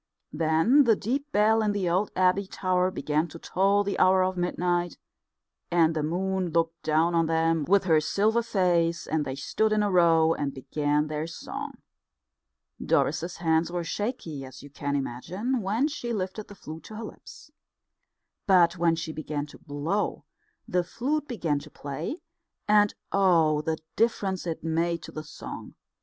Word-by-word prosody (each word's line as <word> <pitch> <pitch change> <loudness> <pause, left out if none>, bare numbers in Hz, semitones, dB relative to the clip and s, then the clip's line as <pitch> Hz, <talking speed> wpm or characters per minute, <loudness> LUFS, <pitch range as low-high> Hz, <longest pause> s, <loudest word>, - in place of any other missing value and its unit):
Then 165 - +4
the 225 -2 +5
deep 275 +9 -3
bell 220 +2 +4
in 210 -1 +1
the 200 -3 -1
old 185 +4 +1
abbey 185 +1 +2
tower 185 -1 0
began 155 -2 -1
to 170 - -10
toll 195 +4 +2
the 200 -1 -2
hour 185 0 +5
of 185 0 -1
midnight, 175 -1 -1 0.7
and 165 -2 +3
the 155 - 0
moon 185 +3 -1
looked 165 0 0
down 160 +2 +2
on 165 -1 +2
them 165 -1 +1
with 200 +4 +4
her 160 -4 +4
silver 215 +8 +2
face, 175 -6 +1
and 155 -2 -1
they 130 - -4
stood 215 +10 0
in 215 -1 +2
a 205 - 0
row 165 -2 +4
and 140 -3 -3
began 145 +2 0
their 155 +1 -3
song. 165 - -7 1.1
Doris's 175 +2 0
hands 165 0 +1
were 175 -1 -2
shaky, 165 - -4
as 130 +1 -11
you 145 - -12
can 145 0 -3
imagine, 180 - -2
when 215 +8 +1
she 240 -6 -4
lifted 200 +1 -4
the 205 - -12
flute 160 -3 -10
to 215 - -9
her 225 - -6
lips. 260 +6 -12 1.0
But 175 -2 +4
when 170 -1 +3
she 160 -1 -4
began 150 -2 -4
to 150 - -15
blow, 155 +8 -2 0.4
the 180 -1 +1
flute 290 - -2
began 170 - -1
to - - -12
play; 155 - -6 0.4
and 210 -1 +4 0.2
oh, 165 -6 +3
the 160 +1 -2 0.2
difference 195 -5 0
it 165 -2 -4
made 165 +1 0
to - - -9
the 155 - -6
song! 155 - -9
175 Hz, 170 wpm, -27 LUFS, 160-200 Hz, 1.1 s, the